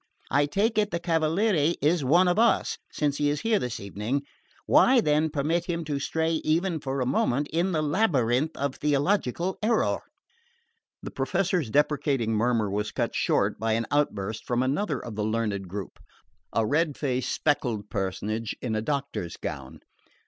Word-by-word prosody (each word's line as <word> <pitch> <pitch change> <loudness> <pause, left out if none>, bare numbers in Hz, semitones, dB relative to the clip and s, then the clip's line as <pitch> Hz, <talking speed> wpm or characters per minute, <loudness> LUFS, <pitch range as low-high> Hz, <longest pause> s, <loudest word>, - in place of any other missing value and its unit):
I 145 +1 +3
take 215 +8 +1
it 210 -1 +1
the 170 - -2
Cavaliere 165 0 +1
is 155 +2 +2
one 170 +8 +4
of 180 +4 +2
us, 235 0 +2
since 145 -2 -1
he 145 0 +2
is 145 0 -1
here 225 -2 +2
this 125 -2 -4
evening: 105 +8 -3 0.4
why, 260 -1 +5
then, 155 -4 +2
permit 160 +4 0
him 170 -1 -2
to 145 -2 -2
stray 160 +3 -1
even 165 +2 +1
for 135 -1 -3
a - - +1
moment 135 +2 +1
in 175 +4 0
the 155 -3 0
labyrinth 150 - +1
of 140 -1 -1
theological 150 +3 0
error?" 220 +1 +1 1.0
The - - -6
Professor's 175 - 0
deprecating 140 -4 +1
murmur 115 0 +1
was 105 +1 -2
cut - - -2
short - - +1
by 110 +1 0
an 115 +1 0
outburst 110 -8 -1
from 120 +1 +1
another 145 +4 0
of 115 - -7
the 105 - -2
learned 105 -3 -1
group, 95 0 -7 0.5
a 115 - +1
red 150 +4 +1
faced 130 -3 -1
spectacled 120 -9 -1
personage 105 +3 -2
in 120 -3 -3
a 110 - 0
doctor's 135 - -3
gown. 65 -1 -7
145 Hz, 165 wpm, -26 LUFS, 115-165 Hz, 1.0 s, why